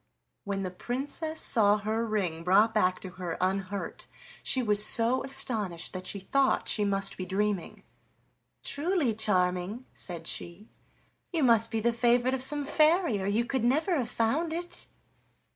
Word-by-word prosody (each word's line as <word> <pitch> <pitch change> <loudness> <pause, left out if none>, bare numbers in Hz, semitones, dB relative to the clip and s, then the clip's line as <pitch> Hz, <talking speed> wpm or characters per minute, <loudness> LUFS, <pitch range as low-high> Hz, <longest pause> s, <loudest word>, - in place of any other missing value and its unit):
When 195 -1 -3
the 185 - -4
Princess 285 - -5
saw 210 -3 +3
her 215 +2 -2
ring 180 -7 -2
brought 205 +5 +3
back 185 -4 +1
to 190 - -7
her 170 -2 -4
unhurt 190 +1 -3 0.3
she 260 - +1
was 210 -2 +6
so 230 +4 +7
astonished 225 -10 -2
that 185 0 -6
she 200 - -5
thought 270 +8 0
she 210 - +1
must 195 -1 -1
be 185 - -4
dreaming. 200 -1 -3 0.8
"Truly, 305 - 0
Charming," 190 +1 -1
said 170 -3 -7
she, 175 +6 -3 0.6
"you 330 -4 -1
must 230 -2 +4
be 225 -1 -2
the 235 +1 +1
favorite 240 +2 +2
of 265 - -2
some 290 +2 -1
fairy, 310 - +2
or 190 - -3
you 220 +4 0
could 260 -1 -2
never 310 +9 +1
have 245 -4 -2
found 300 +9 -1
it." 350 +1 -3
220 Hz, 160 wpm, -28 LUFS, 195-260 Hz, 0.8 s, so